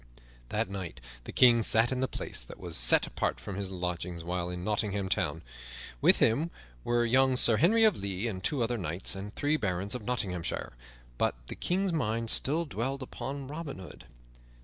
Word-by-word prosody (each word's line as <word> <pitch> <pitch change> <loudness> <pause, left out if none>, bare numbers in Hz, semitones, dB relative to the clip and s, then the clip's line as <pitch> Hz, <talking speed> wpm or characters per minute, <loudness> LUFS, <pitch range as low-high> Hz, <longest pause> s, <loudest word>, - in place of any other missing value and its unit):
That - - 0
night 95 -3 -6 0.3
the - - -6
King 120 -2 +6
sat 115 +2 +4
in 130 - -1
the 130 - +1
place - - -4
that - - -11
was 85 -3 -5
set - - +5
apart - - -2
for 100 - -7
his 100 0 -3
lodging 90 -1 -4
while 90 0 -2
in 90 0 -5
Nottingham 100 -1 -1
Town. - - -1 0.6
With - - +6
him 145 +10 +2 0.3
were 120 0 +1
young 130 +2 +3
Sir 115 -3 +6
Henry 220 - +4
of 215 - +4
the 100 - -2 0.2
Lea - - +1
and 95 -4 -5
two 135 0 +1
other 120 0 -1
knights 85 +1 -2
and 100 +1 -6
three 150 +2 +1
barons 95 -3 -2
of 125 - -3
Nottinghamshire; 95 - -3 0.5
but - - +1
the - - -5
King's 190 0 0
mind 115 -6 -1
still 160 +5 +2
dwelled 135 0 -3
upon 135 +2 -6
Robin 150 +1 -6
Hood. 95 -1 -11
115 Hz, 190 wpm, -30 LUFS, 95-135 Hz, 0.6 s, King